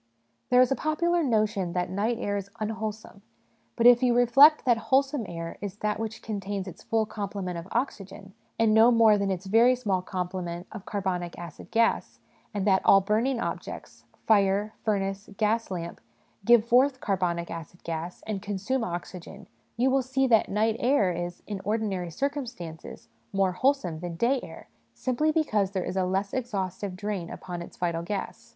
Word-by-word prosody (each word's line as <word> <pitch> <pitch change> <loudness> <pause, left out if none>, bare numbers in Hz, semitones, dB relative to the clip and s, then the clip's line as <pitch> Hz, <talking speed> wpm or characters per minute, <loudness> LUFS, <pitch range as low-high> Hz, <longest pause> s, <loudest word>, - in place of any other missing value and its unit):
There 250 0 +6
is 255 - +3
a - - +3
popular 340 +4 +1
notion 215 - 0
that 180 0 -1
night 215 +5 0
air 205 -4 -2
is 200 -1 -4
unwholesome; 215 -1 -5 0.5
but 235 - 0
if 245 0 +8
you 245 -2 +3
reflect 270 +6 +6
that 240 -2 +4
wholesome 270 -4 +2
air 165 -1 -6
is 205 -1 -5
that 210 0 -2
which 225 0 -5
contains 200 -2 -4
its 185 - -10
full 225 -1 0
complement 200 -4 -4
of 170 - -10
oxygen, 200 -5 -4 0.2
and 225 -1 +3
no 220 +2 +7
more 230 -3 +6
than 200 0 0
its 190 0 -3
very 230 +6 +5
small 200 -7 -1
complement 180 -1 -4
of 215 -3 -9
carbonic 185 -4 -3
acid 170 -3 -10
gas, 230 0 +1 0.3
and 205 -3 -2
that 190 -2 +4
all 195 - +7
burning 225 +6 0
objects - - -6 0.2
fire, 205 0 +3
furnace, 195 -1 -1
gas 225 +1 +1
lamp 170 -2 -5 0.4
give 235 -2 +6
forth 255 +3 +3
carbonic 175 -5 -1
acid 165 +1 -9
gas 165 +1 -5
and 210 -3 -3
consume 210 +5 -2
oxygen, 175 -1 -7 0.3
you 255 +3 +3
will 270 0 +3
see 265 +1 0
that 230 -4 +3
night 215 +2 +1
air 240 -7 +3
is, 175 0 -5
in 205 -2 -5
ordinary 200 -4 -1
circumstances, 235 - -5 0.2
more 195 -1 +2
wholesome 185 - 0
than 175 0 -5
day 245 +9 +2
air, - - -11 0.3
simply 275 +5 0
because 215 - +1
there 190 -2 -3
is - - -4
a 190 -1 +1
less 195 +2 -1
exhaustive 200 -6 -3
drain 195 -3 -4
upon 175 -2 -7
its 170 - -11
vital 170 -2 -1
j;as. 195 +4 -5
205 Hz, 170 wpm, -27 LUFS, 185-235 Hz, 0.5 s, if